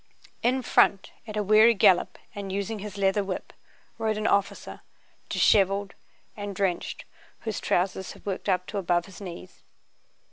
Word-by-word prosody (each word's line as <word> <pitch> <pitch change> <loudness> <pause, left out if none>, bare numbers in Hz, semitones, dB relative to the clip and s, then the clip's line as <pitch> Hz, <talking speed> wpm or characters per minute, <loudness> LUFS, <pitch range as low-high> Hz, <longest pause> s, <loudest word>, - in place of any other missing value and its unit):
In 255 +2 +1
front, 195 -3 +3 0.2
at 215 -1 -5
a 210 - +1
weary 215 +3 +6
gallop 185 -2 +4 0.2
and 200 -1 -6
using 200 +3 -3
his 205 0 -7
leather 195 +1 +2
whip, 190 -1 -5 0.5
rode 220 -1 0
an 215 - -3
officer, 200 -2 0 0.5
disheveled 195 0 +3 0.4
and 205 -1 -6
drenched, 185 -2 -2 0.4
whose 220 -6 -3
trousers 190 +1 -1
had - - -18
worked 200 0 -3
up 180 -1 +1
to 205 - -4
above 175 -2 +1
his 195 +1 -13
knees. 180 -1 -9
200 Hz, 150 wpm, -26 LUFS, 190-210 Hz, 0.5 s, weary